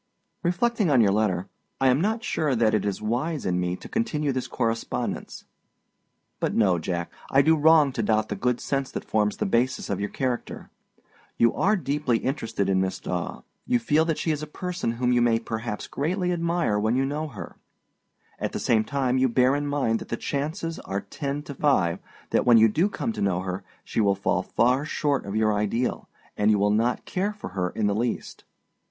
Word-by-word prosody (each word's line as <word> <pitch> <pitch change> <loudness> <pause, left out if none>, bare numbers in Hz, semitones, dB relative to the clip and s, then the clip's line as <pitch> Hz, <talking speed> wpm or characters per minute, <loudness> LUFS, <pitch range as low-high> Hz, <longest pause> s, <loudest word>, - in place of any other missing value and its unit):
Reflecting 200 +3 +1
on 135 -4 +4
your 105 -4 +5
letter, 100 -3 0 0.3
I 135 - +4
am 130 +4 +3
not 220 +4 0
sure 150 - 0
that 110 -2 +3
it 105 -2 +1
is 100 +1 -2
wise 130 +8 -1
in 90 -1 +1
me 90 0 -1
to - - -11
continue 155 -11 -1
this 130 -1 -3
correspondence. 115 -2 -3 0.9
But - - -1
no, 95 -6 +3
Jack; 85 +1 -3 0.2
I 135 +1 +5
do 160 +2 +5
wrong 155 -2 +5
to 125 - -2
doubt 110 0 +1
the 105 - -2
good 125 +4 0
sense 135 -1 -2
that - - -4
forms 105 -2 +1
the - - -1
basis 120 +5 0
of 100 - -1
your 105 - -2
character. 125 -2 -3 0.7
You 115 -1 +4
are 210 +3 +2
deeply 145 - 0
interested 115 -6 -2
in 95 -1 +2
Miss 95 0 -1
Daw; 90 -1 -4 0.2
you 245 - +3
feel 160 -10 +2
that 160 -2 0
she 160 - 0
is 150 -1 -2
a 155 - -5
person 180 -6 -3
whom 125 +1 0
you 120 - +3
may 120 -1 +4
perhaps 115 -1 -4
greatly 180 +5 -1
admire 170 -10 0
when 110 +3 +1
you 135 +1 +2
know 150 +3 -2
her: 140 - -9 0.8
at - - -3
the - - -2
same 110 -2 +2
time 130 0 0
you 130 0 +3
bear 130 +3 +3
in 145 0 -2
mind 135 -6 0
that - - -10
the 115 - -2
chances 160 - -3
are 100 +1 -4
ten 145 -1 -4
to 145 - -7
five 125 - +2 0.3
that, - - +3
when 120 -2 +6
you 110 0 +7
do 165 - +1
come 230 +2 -3
to - - -5
know 90 -2 +1
her, 95 +1 -4 0.2
she - - -1
will 100 -2 +3
fall 95 -2 0
far 125 +8 +2
short 145 -4 -1
of 100 - -4
your 110 -1 +2
ideal, 105 +4 -1 0.3
and 105 +1 +2
you 105 - +4
will 100 +1 +2
not 115 +3 +1
care 200 +3 -1
for 210 - -8
her 90 -1 -2
in 105 - -2
the 100 - +2
least. 115 +3 -3
125 Hz, 210 wpm, -25 LUFS, 105-150 Hz, 0.9 s, you